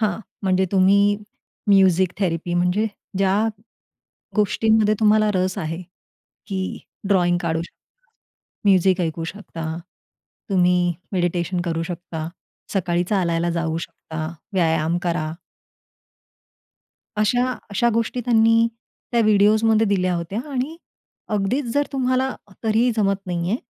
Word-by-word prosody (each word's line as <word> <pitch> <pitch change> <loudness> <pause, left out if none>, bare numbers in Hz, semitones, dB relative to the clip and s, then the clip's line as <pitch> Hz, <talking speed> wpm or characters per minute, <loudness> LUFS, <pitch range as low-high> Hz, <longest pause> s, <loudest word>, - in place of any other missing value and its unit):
हां, 215 0 0 0.2
म्हणजे 190 0 +2
तुम्ही 200 +2 +4 0.5
म्युझिक 190 -2 +4
थेरपी 175 -2 -1
म्हणजे 180 +5 +2 0.3
ज्या 195 +3 +2 0.9
गोष्टींमध्ये 215 +1 +3
तुम्हाला 215 0 +4
रस 185 +1 0
आहे 165 +1 -4 0.6
की 190 -2 -3 0.3
ड्रॉइंग 175 -3 +3
काढू 165 0 0
शकता. - - -17 0.5
म्युझिक 190 -1 +4
ऐकू 165 -1 -2
शकता. 165 -4 -6 0.7
तुम्ही 180 -2 +3 0.2
मेडिटेशन 175 0 0
करू 165 -1 -1
शकता. 165 -2 -5 0.5
सकाळी 175 -2 +1
चालायला 175 -3 0
जाऊ 165 -1 -1
शकता, 160 -1 -6 0.3
व्यायाम 165 -1 +2
करा. 160 -3 -1 1.9
अशा 245 +4 +2 0.2
अशा 235 +4 +2
गोष्टी 230 +2 0
त्यांनी 230 -1 +4 0.5
त्या 235 - +3
व्हिडिओजमध्ये 215 +1 +4
दिल्या 185 -3 +1
होत्या. 170 +7 -3
आणि 275 +4 -2 0.5
अगदीचं 230 +5 0
जर 285 +3 +1
तुम्हाला 260 0 +1 0.3
तरी 220 0 +2
ही 250 - +3
जमत 195 -2 0
नाही 175 0 -2
आहे. 225 - +2
190 Hz, 115 wpm, -22 LUFS, 175-215 Hz, 1.9 s, तुम्ही